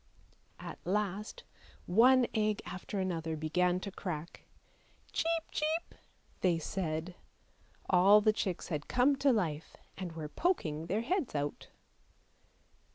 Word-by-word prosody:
At - - -8
last 210 - -2 0.4
one 245 +7 +6
egg 215 -2 0
after 190 +2 -5
another 165 -4 -2
began 175 +4 +1
to 200 - -5
crack. 170 -4 -6 0.3
" - - -31
Cheep, 330 0 +1
cheep! 315 +2 -1 0.2
" - - -35
they 175 -3 +3
said. 165 0 -3 0.7
All 195 +3 +7
the 215 0 +3
chicks 185 -4 -3
had 150 -4 -3
come 255 +3 +3
to 275 0 +4
life, 165 -9 -2 0.2
and 180 -3 -5
were 160 -2 -5
poking 160 - -1
their 205 +5 0
heads 310 - -1
out. 145 0 -3
190 Hz, 130 wpm, -32 LUFS, 165-230 Hz, 0.7 s, All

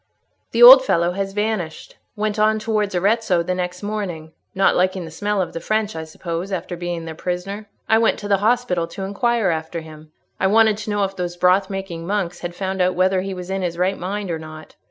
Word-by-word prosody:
"The 235 +1 +4
old 260 +2 +11
fellow 170 -7 +1
has 195 +1 -3
vanished; 210 -6 -3 0.2
went 215 0 -2
on 215 +1 +3
towards 210 -2 -1
Arezzo 195 -1 +2
the 185 - -1
next 180 +1 -4
morning; 190 -7 -4 0.2
not 195 0 +3
liking 185 0 +1
the 160 - -9
smell 205 +4 -2
of 170 - -8
the 165 - -4
French, 215 +3 -1
I 160 0 -5
suppose, 170 +3 -5
after 180 -1 -4
being 175 -1 -4
their 160 - -6
prisoner. 190 +5 -5 0.2
I 220 - +4
went 225 - +2
to 205 - -5
the 200 -1 +3
hospital 210 -5 +1
to 195 - -7
inquire 215 +2 0
after 160 +1 -4
him; 155 -1 -13 0.3
I 190 - +2
wanted 220 +1 +4
to 215 0 -6
know 205 -1 0
if 195 0 -2
those 175 -1 -4
broth 185 +2 +3
making 190 -4 -5
monks 195 -3 -2
had 175 0 -6
found 190 0 -2
out 180 0 +2
whether 185 +1 +2
he 195 0 -5
was 180 +1 -7
in 195 0 -2
his 170 -2 -3
right 185 +2 +1
mind 195 +1 -4
or 165 - -3
not. 155 0 -11
190 Hz, 220 wpm, -21 LUFS, 175-210 Hz, 0.3 s, old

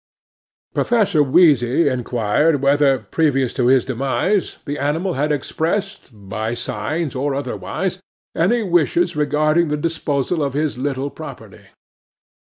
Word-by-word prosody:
'PROFESSOR 215 -10 +2
WHEEZY 145 -1 +4
inquired 130 +3 +1
whether, 140 -1 +4
previous 135 -6 +1
to 120 - +1
his 130 -1 +4
demise, 135 - -1
the 145 +1 -4
animal 160 +6 -1
had 150 +3 0
expressed, 170 +8 -2
by 110 +2 -5
signs 130 +7 -3
or 135 +1 -1
otherwise, 140 - -3 0.4
any 225 +8 +2
wishes 175 -1 +1
regarding 155 +3 +2
the 150 0 -1
disposal 155 0 -1
of 140 -2 -2
his 150 0 0
little 140 +1 -2
property. - - -11
145 Hz, 120 wpm, -20 LUFS, 130-165 Hz, 0.4 s, WHEEZY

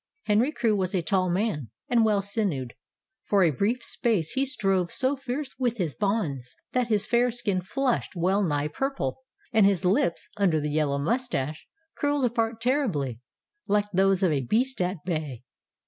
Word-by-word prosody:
Henry 225 +7 +2
Crewe 230 -8 +1
was 190 -1 -1
a 180 - 0
tall 185 +2 +1
man, 175 - -1 0.2
and 235 -2 +3
well 210 -3 +2
sinewed, 190 - -1
and - - -25 0.5
for 200 -2 +3
a 165 - +4
brief 225 - 0
space 215 -9 0
he 270 +1 0
strove 195 -9 0
so 265 +2 +2
fiercely 270 +1 -5
with 240 -2 0
his 170 -8 -1
bonds 170 - -2 0.2
that 250 -2 +1
his 215 -2 +2
fair 240 +2 +3
skin 210 -6 -1
flushed 255 +3 -1
well 185 +4 +2
nigh 145 -4 0
purple, 210 - -3 0.3
and 215 -3 +6
his 195 -2 +1
lips, 180 -2 +1
under 180 -6 +2
the 150 0 -2
yellow 145 -2 +1
mustache, 155 - -2 0.3
curled 290 -2 +1
apart 230 -1 0
terribly, 210 - 0 0.5
like 205 0 +1
those 195 +1 +3
of 180 - +4
a 140 -3 +1
beast 240 - 0
at 180 +2 0
bay. 155 -8 -3
200 Hz, 175 wpm, -26 LUFS, 165-235 Hz, 0.5 s, and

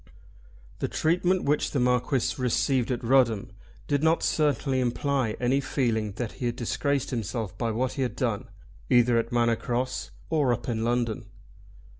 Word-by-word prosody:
The - - -1
treatment 180 +3 +1
which 145 +1 +1
the 140 - -1
Marquis 125 0 +1
received 125 0 +1
at 125 -1 -2
Rudham 115 -5 +3 0.4
did 145 -1 +1
not 160 +1 +3
certainly 140 -3 +1
imply 130 -1 0
any 125 +2 +2
feeling 110 -7 -1
that 115 +1 -4
he 125 - -4
had 120 - -2
disgraced 140 +3 -1
himself 110 -4 -3
by 115 +1 -1
what 120 +3 -1
he 140 - -3
had 125 -4 -1
done - - -2 0.4
either 120 -1 +4
at 115 - -3
Manor 120 -1 +3
Cross 125 +1 -2 0.2
or 145 -6 +3
up - - -5
in 115 -2 -1
London. 120 -2 -1
125 Hz, 160 wpm, -27 LUFS, 115-135 Hz, 0.4 s, either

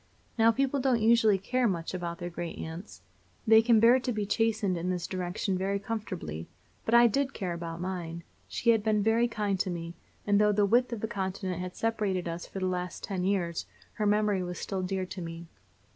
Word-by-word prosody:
Now 225 0 +5
people 275 +3 0
don't 255 -3 +2
usually 220 -2 +4
care 245 +6 0
much 170 -4 -2
about 170 -2 -4
their 175 +1 -5
great 170 0 -5
aunts. 165 +5 -8 0.4
They 220 -1 +7
can 230 -1 +4
bear 235 +3 +6
to 255 - -2
be 210 -3 -2
chastened 215 -2 +1
in 175 +1 -2
this 180 -1 -2
direction 185 +1 -2
very 195 +1 0
comfortably; 195 - -5 0.4
but 230 - +2
I 240 0 +8
did 275 +4 +1
care 185 -4 -3
about 170 -1 -6
mine. 170 -2 -4 0.2
She 235 - +2
had 225 -2 +3
been 210 -1 +2
very 225 +2 +3
kind 210 -4 -1
to 195 - 0
me, 170 -1 -5 0.3
and 205 0 +3
though 210 0 +4
the 205 0 +3
width 240 +4 +3
of 230 -3 -5
a - - +1
continent 190 -3 -3
had 180 0 -6
separated 205 -6 -1
us 170 +1 -5
for - - -9
the 190 - -1
last 180 -1 -3
ten 190 -3 -3
years 180 -3 -1 0.3
her 210 - -1
memory 210 -2 +2
was 180 -1 -4
still 195 -2 -3
dear 185 0 -2
to 185 0 -7
me. 165 0 -7
195 Hz, 210 wpm, -29 LUFS, 180-225 Hz, 0.4 s, I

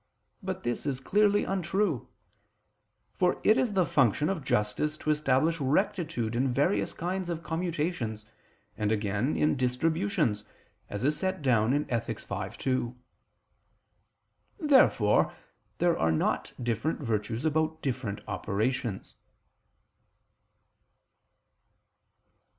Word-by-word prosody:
But 190 -1 -4
this 120 +4 -2
is 135 -2 -1
clearly 205 +7 +3
untrue: 190 - -1 1.1
for 180 -1 +1
it 215 - +6
is 235 -5 +1
the 185 -3 +3
function 135 +2 +2
of 185 -7 -2
justice 120 +7 0
to 155 - 0
establish 150 +2 +2
rectitude 155 - 0
in 130 +2 +1
various 145 +10 +1
kinds 180 +1 -3
of 170 -1 -3
commutations, 155 -9 -2 0.5
and 105 -1 -1
again 105 +5 0
in 150 - +2
distributions, 145 - 0 0.5
as 100 +3 -4
is 150 +2 +1
set 185 -3 -2
down 120 -3 +3
in 145 +2 +1
Ethic. 120 -2 -2
v, - - -4
2. 130 -2 -2 1.6
Therefore 295 -5 +4 0.4
there 175 -1 +3
are 80 - +1
not 80 - 0
different 120 +7 -1
virtues 115 +1 -2
about 160 0 0
different 120 -6 -3
operations. 110 0 -2
150 Hz, 110 wpm, -29 LUFS, 120-175 Hz, 1.6 s, it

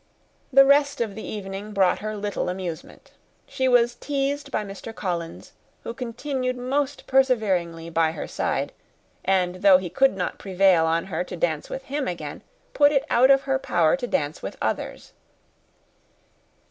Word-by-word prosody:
The 275 +1 +7
rest 280 +1 +3
of 225 -4 -1
the 220 - -7
evening 200 0 -6
brought 190 -2 +3
her 215 0 -4
little 205 -2 -2
amusement. 180 -3 -7 0.3
She 260 - -1
was 240 -1 +4
teased 285 +1 -2
by 210 - -2
Mr. 200 +3 -9
Collins, 170 -3 -4 0.3
who - - -5
continued 255 +1 -3
most 275 +3 -2
perseveringly 195 -11 +1
by 160 -1 +2
her 160 - -6
side; - - -2 0.5
and 185 -1 +1
though 195 -2 +7
he 180 -2 -6
could 270 0 +3
not 180 - -3
prevail 185 -4 +3
with 165 +3 -1
her 165 0 -1
to 180 - -7
dance 160 -3 -1
with 265 - -5
him 280 +1 -3
again, 155 -5 -5 0.3
put 290 0 +5
it 275 -2 +1
out 255 +3 +5
of 270 0 +6
her 270 -1 0
power 170 -9 +2
to 255 -2 -4
dance 150 -8 -2
with - - -6
others. - - -4
210 Hz, 160 wpm, -24 LUFS, 180-265 Hz, 0.5 s, The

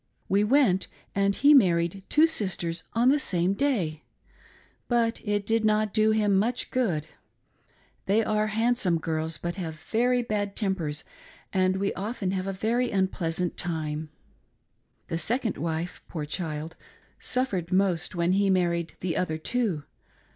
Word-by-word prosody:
We 200 +2 +3
went, 210 -6 +3 0.3
and 200 0 +2
he 290 +1 +6
married 175 - +3
two 310 +2 +6
sisters 185 - -1
on 235 +2 +4
the 290 +2 +4
same 180 -6 +1
day, 200 - -1 0.8
but 235 -1 +1
it 205 -2 -1
did 225 +1 +1
not 215 -1 +2
do 215 -1 +4
him 210 -2 +3
much 235 +4 -1
good. 185 - 0 1.0
They 210 +4 +3
are 215 0 +1
handsome 225 -5 +1
girls, 160 0 -2
but 175 +4 -4
have 165 -4 -4
very 245 +8 +1
bad 205 -3 -2
tempers 175 -8 -1 0.5
and 185 0 +2
we 200 +1 -1
often 200 -1 -3
have 190 0 -2
a - - -1
very 230 +6 0
unpleasant 180 -3 -1
time. 155 -2 -3 1.0
The 165 - -2
second 230 - 0
wife, 165 +2 -3
poor 155 -4 -4
child, 155 0 -4 0.4
suffered 200 -10 -1
most 185 -3 +1
when 170 +1 +1
he 195 +1 +3
married 170 -3 +1
the 175 -2 -1
other 160 -3 -1
two. 195 -3 -1
195 Hz, 145 wpm, -27 LUFS, 170-220 Hz, 1.0 s, he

